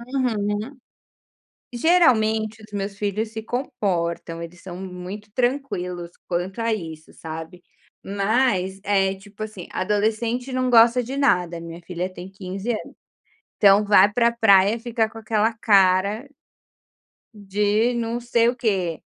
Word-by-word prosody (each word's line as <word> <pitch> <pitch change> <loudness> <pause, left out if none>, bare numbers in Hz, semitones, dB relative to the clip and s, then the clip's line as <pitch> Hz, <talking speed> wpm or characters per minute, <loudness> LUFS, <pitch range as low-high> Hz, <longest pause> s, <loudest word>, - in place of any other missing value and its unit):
Uhum. 220 0 -1 1.0
Geralmente 225 -8 +3
os 215 -1 -15
meus 200 0 -4
filhos 210 +2 -2
se 220 - -5
comportam, 190 - -2
eles 170 +1 -9
são 180 -2 -8
muito 190 +3 -8
tranquilos 200 -9 -2 0.2
quanto 180 +4 -3
a 230 -1 +1
isso, 160 -5 -7
sabe. 160 +2 -8 0.4
Mas, 200 -2 0
eh, 195 -2 +2
tipo 205 +2 -10
assim, 210 -5 -8
adolescente 220 +6 -1
não 255 0 0
gosta 235 +1 +6
de 260 +4 -5
nada, 180 -11 +1
minha 170 0 -8
filha 180 +1 -4
tem 185 +1 -9
15 195 +4 -5
anos, 215 - -5 0.6
então 200 +1 +5
vai 205 0 +5
para 235 +1 +3
praia 205 -2 +4
ficar 230 -1 -1
com 225 +1 -11
aquela 220 0 +1
cara 200 +3 +3 1.1
de 210 +3 +1
não 235 0 -2
sei 235 -1 +2
o 250 - -2
quê, 190 - -1
210 Hz, 130 wpm, -23 LUFS, 185-230 Hz, 1.1 s, gosta